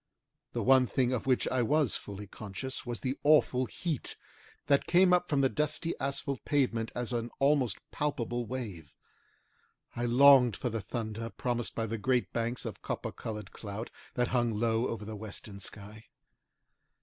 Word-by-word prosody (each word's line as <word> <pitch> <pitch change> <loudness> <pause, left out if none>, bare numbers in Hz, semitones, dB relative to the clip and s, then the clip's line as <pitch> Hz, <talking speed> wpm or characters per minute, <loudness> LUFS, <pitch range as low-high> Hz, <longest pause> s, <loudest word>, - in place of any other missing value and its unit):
The - - -1
one 130 -1 +6
thing 130 0 +1
of 125 - -2
which 130 -2 +2
I 130 -1 +1
was 145 +1 +2
fully 100 0 -7
conscious 105 +6 -6
was 120 -2 -4
the 130 +1 -2
awful 135 -4 +4
heat, 160 -7 -4 0.5
that 140 -1 +3
came 180 +1 +5
up 180 0 +2
from 140 -2 +2
the 135 - +5
dusty 150 +3 -1
asphalt 140 -1 -2
pavement 125 -6 +1
as 120 0 -2
an 120 0 -1
almost 135 -6 +2
palpable 120 -5 -2
wave. 105 - -6 1.0
I 120 - -1
longed 125 -1 +7
for 125 - -3
the 115 0 -2
thunder 115 +1 -4
promised 120 0 -2
by 115 - -1
the 115 0 -3
great 125 +3 +1
banks 120 +2 -2
of 110 -4 -6
copper - - -3
coloured 105 -3 -6
cloud 105 +2 -6 0.2
that 125 -1 +1
hung 120 -2 +2
low 115 +2 +1
over 110 -2 -4
the 110 +1 -6
western 105 -1 -7
sky. 105 +3 -7
120 Hz, 165 wpm, -31 LUFS, 110-135 Hz, 1.0 s, longed